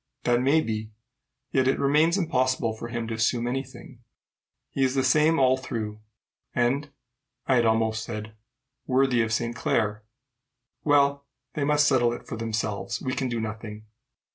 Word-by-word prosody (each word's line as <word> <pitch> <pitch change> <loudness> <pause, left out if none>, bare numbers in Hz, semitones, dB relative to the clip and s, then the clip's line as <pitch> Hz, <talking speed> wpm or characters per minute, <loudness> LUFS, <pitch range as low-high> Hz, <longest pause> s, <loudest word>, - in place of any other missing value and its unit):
"That 120 0 +2
may 140 +5 +4
be; 110 -4 -3 0.6
yet 130 -1 +2
it 135 - +2
remains 150 +6 +3
impossible 130 - 0
for 115 - -7
him 115 -1 -4
to 115 - -3
assume 115 +2 +1
any 130 +2 -1
thing. 130 -2 -14 0.7
He 135 - 0
is 130 0 +1
the 135 - +2
same 155 +5 +4
all 130 -1 +4
through, 110 -4 -5 0.5
and 135 +4 +1 0.6
I 130 - +3
had 120 -1 +3
almost 110 0 +1
said 110 -1 -6 0.5
worthy 130 -2 +3
of 110 -1 -1
Saint 120 +1 -1
Clare. 105 -2 0 0.8
Well, 140 -1 +3 0.3
they 150 - -2
must 150 0 +3
settle 120 -4 +3
it - - -8
for - - -6
themselves. 110 0 -3
We 130 - -3
can 130 -2 -1
do 120 -1 -2
nothing." 110 -1 -6
120 Hz, 165 wpm, -26 LUFS, 110-135 Hz, 0.8 s, may